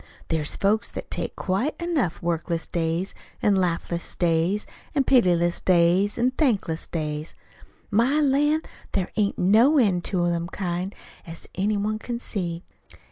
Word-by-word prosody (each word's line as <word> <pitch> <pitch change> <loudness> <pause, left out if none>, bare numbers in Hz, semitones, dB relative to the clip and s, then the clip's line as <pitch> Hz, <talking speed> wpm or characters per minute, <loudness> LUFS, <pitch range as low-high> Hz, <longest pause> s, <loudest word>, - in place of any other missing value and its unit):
"There 160 -1 +1
is 150 - -2
folks 210 +3 +1
that - - -8
take - - -2
quite 200 +11 -1
enough 305 - -1
workless 170 0 -1
days, 170 +2 -2 0.3
an' 205 - +3
laughless 170 -2 -1
days, 175 +4 +1 0.3
an' 280 - +3
pityless 175 -10 +3
days, 180 +3 +3
an' 245 +2 +2
thankless 220 - 0
days. 150 -1 -4 0.6
My 240 +8 +3
lan', 295 +2 +2 0.3
there 190 -2 -1
ain't 205 -2 +1
no 225 - +5
end 195 -9 +3
to 175 -3 +1
them 170 0 -1
kind, 185 +1 -3 0.3
as 165 0 -8
any 205 +2 0
one 215 +2 -1
can 240 +1 -4
see. 175 -7 -2
190 Hz, 145 wpm, -25 LUFS, 170-230 Hz, 0.6 s, no